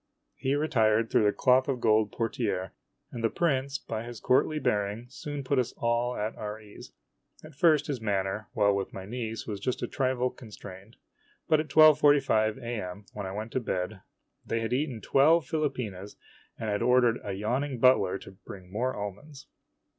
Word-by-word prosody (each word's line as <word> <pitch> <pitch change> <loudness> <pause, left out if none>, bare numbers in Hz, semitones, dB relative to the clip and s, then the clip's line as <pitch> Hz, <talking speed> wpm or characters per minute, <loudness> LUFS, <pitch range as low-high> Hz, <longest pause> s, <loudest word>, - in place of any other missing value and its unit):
He 135 +2 -1
retired 115 -7 +2
through 105 - +4
the 105 - +4
cloth 130 +2 +3
of 135 -3 -1
gold 110 -2 +3
portiere, 110 -5 -2 0.4
and 115 - -6
the 115 - +3
prince, 140 -3 0
by 110 -5 -5
his 120 -1 -8
courtly 140 +7 +2
bearing, 105 -3 -1
soon 145 +1 -6
put 135 +1 +1
us 125 - -1
all 120 +1 0
at 105 +2 -3
our 105 0 -6
ease. 105 -2 -13 0.5
At 155 0 -12
first 150 0 +3
his 135 -5 -4
manner, 100 0 -1
while 100 0 +3
with 100 -1 -3
my 95 - -7
niece, 115 0 -5
was 105 -3 -5
just 125 +5 -2
a - - -1
trifle 130 -2 0
constrained; 100 -2 -12 0.5
but 155 -1 +4
at 155 - -2
12.45 145 -8 +5
A - - -8 0.2
M 90 +3 -8
> - - -38
when 100 -2 -5
I - - -5
went 110 +3 -5
to - - 0
bed, 95 -3 -3 0.4
they 115 0 -2
had 115 +2 -2
eaten 130 -4 -1
twelve 155 +4 +4
philopenas 125 - -3 0.4
and 110 - -5
had 105 - -1
ordered 125 -1 +3
the 100 - -5
yawning 125 +7 -2
butler 125 -6 +4
to - - -12
bring 95 -1 -12
more 125 +5 -1
almonds. 105 +9 -7
115 Hz, 185 wpm, -28 LUFS, 105-135 Hz, 0.5 s, 12.45